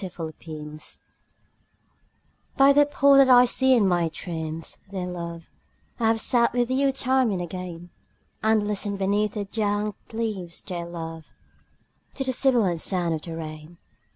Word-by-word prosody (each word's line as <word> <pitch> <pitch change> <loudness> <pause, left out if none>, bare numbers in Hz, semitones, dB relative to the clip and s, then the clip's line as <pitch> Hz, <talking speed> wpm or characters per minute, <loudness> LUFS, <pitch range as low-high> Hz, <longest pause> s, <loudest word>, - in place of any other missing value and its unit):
THE 190 - -4
POOL 165 -2 -6 2.3
By 275 +1 +6
the 290 0 +5
pool 280 -1 +4
that 270 -1 +6
I 250 -1 +8
see 260 +1 +4
in 215 -5 +3
my 175 -2 +1
dreams, 160 -1 -5
dear 190 -2 -4
love, 170 -2 -7 0.5
I 225 - +2
have 225 0 +2
sat 235 0 +3
with 245 0 0
you 270 +1 +2
time 260 -2 +1
and 195 -3 -1
again; 175 -1 -7 0.5
And 220 -1 +2
listened 205 -1 -1
beneath 200 +2 0
the 205 -2 -3
dank 210 0 -1 0.2
leaves, 215 -7 -4
dear 175 -3 -5
love, 165 -2 -8 0.8
To 270 - -2
the 260 -1 -1
sibilant 235 -11 +2
sound 175 -1 0
of 155 - -3
the 165 0 -7
rain. 155 +1 -9
200 Hz, 155 wpm, -25 LUFS, 170-240 Hz, 2.3 s, I